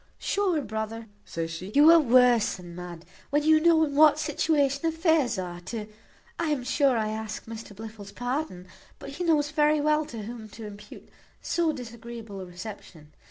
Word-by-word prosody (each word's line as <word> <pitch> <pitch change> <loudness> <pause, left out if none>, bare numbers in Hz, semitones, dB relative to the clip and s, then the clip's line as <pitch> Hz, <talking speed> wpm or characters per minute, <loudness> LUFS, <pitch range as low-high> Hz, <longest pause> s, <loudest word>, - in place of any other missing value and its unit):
"Sure, 385 -5 0
brother," 220 0 -4 0.2
says 165 0 -4
she, 180 +4 -7
"you 300 +3 +8
are 335 - +8
worse 250 -4 +4
than 175 -2 -11
mad, 175 -1 -9 0.2
when 295 +1 +1
you 315 0 +5
know 325 0 +4
in 285 - -5
what 300 +1 +6
situation 290 -2 +1
affairs 320 - +2
are, 175 -2 -5
to 215 +3 -5 0.5
I 335 - 0
am 290 -4 -1
sure 265 0 +2
I 215 -1 0
ask 220 0 -5
Mr 225 -2 -9
Blifil's 215 -1 -9
pardon, 245 - -4 0.3
but - - -9
he 335 +6 -5
knows 300 -3 +2
very 300 0 +3
well 300 +1 +1
to 225 -3 -7
whom 225 0 -8
to 225 - -7
impute 210 0 -11 0.3
so 335 -2 0
disagreeable 235 -5 -8
a - - -6
reception. 180 -4 -10
240 Hz, 175 wpm, -27 LUFS, 210-300 Hz, 0.5 s, you